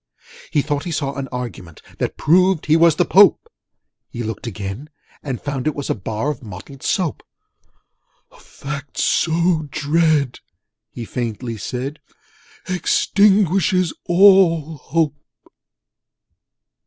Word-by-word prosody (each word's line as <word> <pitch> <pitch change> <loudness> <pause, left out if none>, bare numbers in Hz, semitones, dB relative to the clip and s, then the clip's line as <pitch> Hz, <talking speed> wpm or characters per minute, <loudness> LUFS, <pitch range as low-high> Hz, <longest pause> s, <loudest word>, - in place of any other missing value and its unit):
He 145 - +1
thought 145 -2 -2
he 175 - -4
saw 140 -3 -2
a 140 -1 -4
Argument 115 -10 -7 0.2
That - - -2
proved 180 +1 +3
he 155 - +3
was 165 -1 +5
the 180 - +2
Pope: 195 -2 +5 0.6
He 120 - -6
looked 110 +2 -5
again, 105 +6 -6 0.3
and 135 -4 -4
found 145 -1 -4
it 155 - 0
was 145 - -3
A - - +2
Bar 110 +7 -3
of 145 - -8
Mottled 115 +5 -11
Soap. 180 -6 -1 1.1
'A - - -19
fact 145 0 -8
so 165 -1 +1
dread,' 150 -2 +1 0.5
he 120 - -8
faintly 115 0 -4
said, 130 +7 -5 0.7
'Extinguishes 190 -1 +2
all 175 -4 +5
hope!' 150 +1 -1
150 Hz, 120 wpm, -20 LUFS, 125-170 Hz, 1.1 s, was